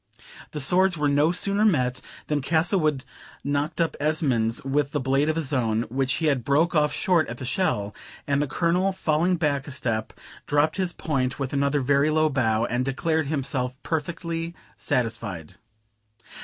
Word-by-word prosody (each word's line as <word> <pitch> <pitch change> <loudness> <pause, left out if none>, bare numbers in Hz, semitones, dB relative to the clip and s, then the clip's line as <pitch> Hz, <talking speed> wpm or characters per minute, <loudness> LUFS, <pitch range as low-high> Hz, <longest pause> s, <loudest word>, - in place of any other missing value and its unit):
The 150 - -6
swords 180 +5 +3
were 150 -1 +1
no 145 +3 +3
sooner 200 +3 +1
met, 125 -11 +2 0.2
than 150 -1 -1
Castlewood 160 -2 +1 0.4
knocked 145 +3 -1
up 165 -2 +1
Esmond's 135 -7 0
with 140 +1 0
the 145 - +1
blade 135 +3 +1
of 155 - +1
his 155 -3 -2
own, 115 -3 +1
which 130 0 +1
he 160 - -1
had 140 -5 +1
broke 150 +8 +2
off 150 -2 +3
short 175 -1 +2
at 120 - -6
the 130 - -6
shell; 115 - -1 0.3
and 140 0 +1
the 145 - 0
Colonel 180 +6 +1
falling 175 0 +1
back 145 -4 -1
a - - -6
step 115 -5 -2 0.4
dropped 145 +3 +2
his 185 -2 0
point 130 -7 -2
with 135 -1 -4
another 140 +1 +1
very 140 +3 +3
low 155 0 +3
bow, 115 -5 +1
and 120 +2 -1
declared 155 +3 0
himself 130 -3 -2
perfectly 165 +1 -3 0.2
satisfied. 115 -9 -2
145 Hz, 170 wpm, -25 LUFS, 130-160 Hz, 0.4 s, swords